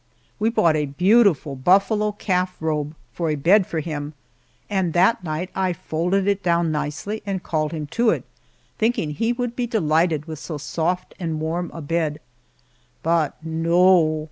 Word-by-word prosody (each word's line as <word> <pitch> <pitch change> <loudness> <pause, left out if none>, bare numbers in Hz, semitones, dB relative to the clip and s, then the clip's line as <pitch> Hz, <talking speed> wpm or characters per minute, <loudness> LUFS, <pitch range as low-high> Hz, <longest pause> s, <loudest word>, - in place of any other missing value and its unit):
We 220 +2 +2
bought 170 -8 +3
a 150 -1 0
beautiful 180 -2 +3
buffalo 200 - +2
calf 185 -3 -1
robe 155 -1 -2 0.2
for 170 -2 -2
a 155 - +1
bed 180 +7 +4
for 160 - -2
him, 150 -1 -5 0.5
and 190 -5 0
that 185 +4 +3
night 165 +3 -3
I 185 -1 0
folded 180 +4 -1
it 200 -1 +1
down 170 -2 +1
nicely 155 +8 -3
and 195 -3 -3
called 155 -2 -1
him 155 -2 -4
to 230 0 +3
it, - - 0 0.6
thinking 220 -9 +1
he 225 +10 0
would 245 -1 -3
be 245 -1 -1
delighted 160 -7 +1
with 160 -3 -7
so 155 -1 -6
soft 170 +5 -2
and 165 -3 -3
warm 165 +3 -2
a 165 - -8
bed. 155 -1 -1 0.8
But 165 -3 +1
no! 165 0 +3
170 Hz, 165 wpm, -22 LUFS, 155-195 Hz, 0.8 s, bed